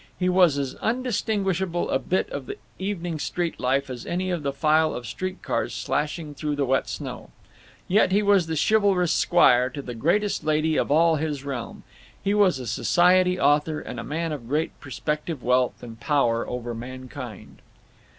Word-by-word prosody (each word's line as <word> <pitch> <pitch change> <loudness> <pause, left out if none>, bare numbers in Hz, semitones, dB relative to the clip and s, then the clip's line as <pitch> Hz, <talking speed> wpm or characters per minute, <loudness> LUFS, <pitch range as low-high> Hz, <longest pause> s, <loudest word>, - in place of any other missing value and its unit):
He 180 0 +1
was 180 -5 +4
as 135 -2 -2
undistinguishable 200 -7 -1
a 130 - +2
bit 185 +7 0
of 135 -3 -5
the - - -6 0.2
evening 175 -4 -3
street 170 +2 -2
life 135 +2 +1
as 125 -2 -7
any 185 +2 -2
of 175 -3 -2
the 140 -1 -1
file 155 +3 +2
of 120 - -6
street 185 +11 -5
cars - - -2
slashing 150 +1 -2
through 145 +2 -3
the 145 -1 0
wet 130 +1 +1
snow. - - -6 0.6
Yet, 195 0 +3
he 205 +2 +3
was 200 -4 +4
the 160 - -2
chivalrous 200 -5 +3
squire 125 -8 +4
to 135 - -8
the 125 - -6
greatest 175 - 0
lady 155 +1 +1
of - - 0
all 160 +2 +4
his 150 -3 -3
realm; 135 -4 -5 0.4
he 200 - 0
was 200 -7 +4
a 130 - -6
society 180 +9 +3
author, 150 +1 +2
and - - -7
a - - -5
man 165 +2 -3
of 135 -6 -6
great 150 +5 0
prospective 150 +1 -4
wealth 125 0 +1
and 115 -2 -9
power 120 -5 +1
over 120 -1 -4
mankind! 130 -1 -9
155 Hz, 180 wpm, -25 LUFS, 130-180 Hz, 0.6 s, was